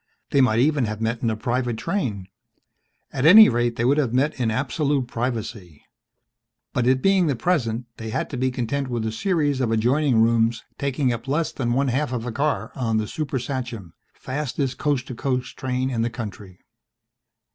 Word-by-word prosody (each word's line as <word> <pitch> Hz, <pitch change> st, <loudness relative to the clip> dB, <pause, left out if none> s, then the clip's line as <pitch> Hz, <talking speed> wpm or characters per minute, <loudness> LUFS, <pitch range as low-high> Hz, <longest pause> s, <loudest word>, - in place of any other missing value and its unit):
They 140 Hz, -, +4 dB
might 110 Hz, -4 st, +3 dB
even 140 Hz, +1 st, +3 dB
have 110 Hz, -1 st, -4 dB
met 115 Hz, +1 st, -2 dB
in 115 Hz, -, +1 dB
a 110 Hz, -, -2 dB
private 120 Hz, 0 st, -1 dB
train. 110 Hz, -, -2 dB, 0.9 s
At 130 Hz, -, -2 dB
any 210 Hz, +8 st, +9 dB
rate 120 Hz, 0 st, 0 dB
they 115 Hz, -, -1 dB
would 140 Hz, +4 st, +3 dB
have 125 Hz, -5 st, 0 dB
met 140 Hz, +2 st, +1 dB
in 120 Hz, -3 st, +1 dB
absolute 135 Hz, +3 st, 0 dB
privacy. 110 Hz, -, -5 dB, 0.9 s
But 125 Hz, -1 st, 0 dB
it 130 Hz, 0 st, +2 dB
being 195 Hz, -3 st, +4 dB
the 140 Hz, -, +1 dB
present, 120 Hz, -4 st, 0 dB
they 110 Hz, 0 st, -6 dB
had -, -, -2 dB
to -, -, -4 dB
be 130 Hz, +1 st, +1 dB
content 130 Hz, +2 st, -2 dB
with 120 Hz, -3 st, -2 dB
a 110 Hz, -, -1 dB
series 145 Hz, -, 0 dB
of 120 Hz, -, +1 dB
adjoining 125 Hz, +3 st, +2 dB
rooms 115 Hz, 0 st, +2 dB, 0.2 s
taking 135 Hz, -2 st, 0 dB
up 120 Hz, +3 st, -7 dB
less 150 Hz, +4 st, 0 dB
than 120 Hz, -3 st, -2 dB
one 135 Hz, +2 st, +1 dB
half 135 Hz, +2 st, -1 dB
of 120 Hz, -2 st, -3 dB
a 125 Hz, -, -3 dB
car 120 Hz, -4 st, -1 dB
on 115 Hz, -4 st, -1 dB
the 110 Hz, -, 0 dB
Super 145 Hz, 0 st, -3 dB
Sachem, 120 Hz, -, -5 dB, 0.2 s
fastest 135 Hz, -1 st, -3 dB
coast 140 Hz, -4 st, 0 dB
to 130 Hz, -, -7 dB
coast 125 Hz, +1 st, -2 dB
train 130 Hz, 0 st, -2 dB
in 115 Hz, -3 st, -1 dB
the 115 Hz, -, 0 dB
country. 105 Hz, -5 st, -8 dB
125 Hz, 190 wpm, -23 LUFS, 115-140 Hz, 0.9 s, any